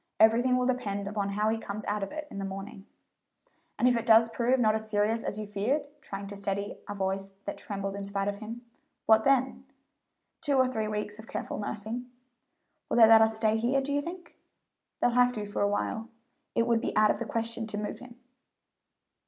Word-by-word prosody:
Everything 240 Hz, +3 st, +5 dB
will 250 Hz, -, +1 dB
depend 205 Hz, -6 st, -1 dB
upon 200 Hz, -1 st, -2 dB
how 210 Hz, +2 st, +1 dB
he 225 Hz, 0 st, 0 dB
comes 210 Hz, -1 st, -6 dB
out 210 Hz, 0 st, -1 dB
of 195 Hz, -, -4 dB
it 305 Hz, -1 st, -6 dB
in 200 Hz, -, -6 dB
the -, -, -3 dB
morning." 195 Hz, 0 st, -7 dB, 0.9 s
"And 250 Hz, -, +3 dB
if 250 Hz, -, +4 dB
it 230 Hz, -, -2 dB
does 225 Hz, 0 st, +7 dB
prove 245 Hz, +3 st, +1 dB
not 215 Hz, -3 st, +4 dB
as 220 Hz, 0 st, -3 dB
serious 215 Hz, +2 st, +1 dB
as 205 Hz, -, -3 dB
you 215 Hz, -, -4 dB
feared" 215 Hz, +9 st, -1 dB, 0.2 s
trying 200 Hz, -5 st, -6 dB
to 200 Hz, +1 st, -7 dB
steady 200 Hz, 0 st, -3 dB
a 205 Hz, -, -4 dB
voice 195 Hz, 0 st, -2 dB, 0.2 s
that 200 Hz, -, -5 dB
trembled 195 Hz, -1 st, -4 dB
in 200 Hz, 0 st, -5 dB
spite 200 Hz, 0 st, -2 dB
of 200 Hz, 0 st, -2 dB
him 225 Hz, +3 st, -8 dB, 0.4 s
"what 220 Hz, 0 st, +5 dB
then?" 265 Hz, -1 st, +2 dB, 0.8 s
"Two 290 Hz, -3 st, +1 dB
or 260 Hz, -1 st, +5 dB
three 220 Hz, -4 st, -2 dB
weeks 210 Hz, 0 st, -3 dB
of 220 Hz, -, -11 dB
careful -, -, -4 dB
nursing." 220 Hz, +4 st, -4 dB, 0.8 s
"Will -, -, 0 dB
they 230 Hz, -, +10 dB
let 225 Hz, 0 st, +8 dB
us 220 Hz, 0 st, +3 dB
stay 220 Hz, 0 st, +2 dB
here, 245 Hz, +5 st, +2 dB
do 275 Hz, +1 st, -2 dB
you 285 Hz, -, +1 dB
think?" 345 Hz, +2 st, -9 dB, 0.6 s
"They'll 245 Hz, -, +3 dB
have 250 Hz, +1 st, +4 dB
to 210 Hz, -3 st, -4 dB
for 205 Hz, -, -3 dB
a 205 Hz, -, +3 dB
while. 220 Hz, +2 st, -2 dB, 0.5 s
It 230 Hz, -, +3 dB
would 235 Hz, -1 st, +2 dB
be -, -, -2 dB
out 215 Hz, 0 st, +6 dB
of -, -, -3 dB
the -, -, -3 dB
question 230 Hz, 0 st, -2 dB
to 210 Hz, -, -3 dB
move 210 Hz, 0 st, -4 dB
him." 250 Hz, -1 st, -12 dB
220 Hz, 215 wpm, -29 LUFS, 205-240 Hz, 0.9 s, they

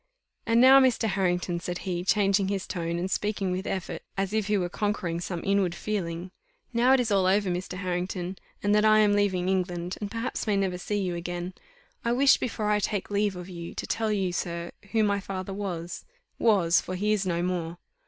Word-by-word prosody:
"And 230 Hz, 0 st, +4 dB
now, 265 Hz, +2 st, +9 dB
Mr. 255 Hz, -4 st, +3 dB
Harrington," 180 Hz, -3 st, 0 dB
said 175 Hz, 0 st, -4 dB
he, 175 Hz, -2 st, -2 dB
changing 195 Hz, 0 st, +3 dB
his 195 Hz, -1 st, -2 dB
tone 170 Hz, -2 st, -3 dB
and 185 Hz, +2 st, -2 dB
speaking 205 Hz, -2 st, -1 dB
with 185 Hz, +1 st, -3 dB
effort, 190 Hz, -2 st, -3 dB, 0.2 s
as 195 Hz, +1 st, -1 dB
if 215 Hz, -2 st, 0 dB
he 210 Hz, -1 st, +2 dB
were 180 Hz, -2 st, 0 dB
conquering 175 Hz, -3 st, -2 dB
some 175 Hz, -1 st, -4 dB
inward 195 Hz, -3 st, +1 dB
feeling, 180 Hz, -4 st, -3 dB, 0.4 s
"now 245 Hz, +3 st, +4 dB
it 265 Hz, -, +5 dB
is 235 Hz, -3 st, 0 dB
all 195 Hz, -2 st, +3 dB
over, 195 Hz, 0 st, +2 dB
Mr. 180 Hz, +1 st, -4 dB
Harrington, 180 Hz, 0 st, -3 dB, 0.2 s
and 205 Hz, 0 st, +3 dB
that 210 Hz, 0 st, +4 dB
I 215 Hz, 0 st, +6 dB
am 210 Hz, -1 st, +5 dB
leaving 190 Hz, -3 st, +1 dB
England, 180 Hz, -2 st, -1 dB
and 205 Hz, -, -3 dB
perhaps 230 Hz, +2 st, -3 dB
may 205 Hz, -2 st, +2 dB
never 190 Hz, -2 st, 0 dB
see 205 Hz, +3 st, -2 dB
you 185 Hz, -3 st, -1 dB
again; 175 Hz, +1 st, -4 dB, 0.5 s
I 235 Hz, 0 st, +1 dB
wish 270 Hz, +2 st, +5 dB
before 215 Hz, -3 st, -2 dB
I 210 Hz, -, +3 dB
take 205 Hz, 0 st, -2 dB
leave 205 Hz, -1 st, +1 dB
of 180 Hz, 0 st, -7 dB
you, 170 Hz, -2 st, -8 dB
to -, -, -4 dB
tell 225 Hz, -1 st, -1 dB
you, 195 Hz, -3 st, 0 dB
sir, 170 Hz, -1 st, -3 dB, 0.2 s
who 225 Hz, -1 st, +3 dB
my 200 Hz, -1 st, +2 dB
father 195 Hz, -1 st, -5 dB
was 180 Hz, -4 st, -4 dB, 0.4 s
was, 190 Hz, -7 st, +4 dB
for 185 Hz, -, -5 dB
he 210 Hz, +3 st, +1 dB
is 200 Hz, -3 st, 0 dB
no 170 Hz, -1 st, 0 dB
more. 175 Hz, -2 st, -2 dB
190 Hz, 210 wpm, -27 LUFS, 180-210 Hz, 0.5 s, now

